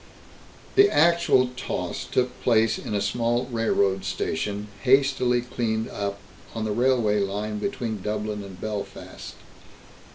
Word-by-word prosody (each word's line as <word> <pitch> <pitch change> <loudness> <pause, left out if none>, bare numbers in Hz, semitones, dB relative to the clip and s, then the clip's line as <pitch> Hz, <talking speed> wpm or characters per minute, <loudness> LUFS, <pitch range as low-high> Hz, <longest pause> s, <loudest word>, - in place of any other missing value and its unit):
The 400 +1 +8
actual 170 - +4
toss 130 - -4
took 125 0 -1
place 115 -2 +3
in 105 - -4
a 100 - +1
small 120 +2 0
railroad 100 -4 +1
station, 105 +5 -2
hastily 130 -2 +3
cleaned 115 -2 -2
up, 100 0 -3 0.4
on 110 -1 -2
the 110 - -1
railway 120 -3 +2
line 105 +2 -2
between 115 - -3
Dublin 105 0 -3
and 95 -2 -10
Belfast. 105 -2 -6
110 Hz, 125 wpm, -25 LUFS, 105-125 Hz, 0.4 s, The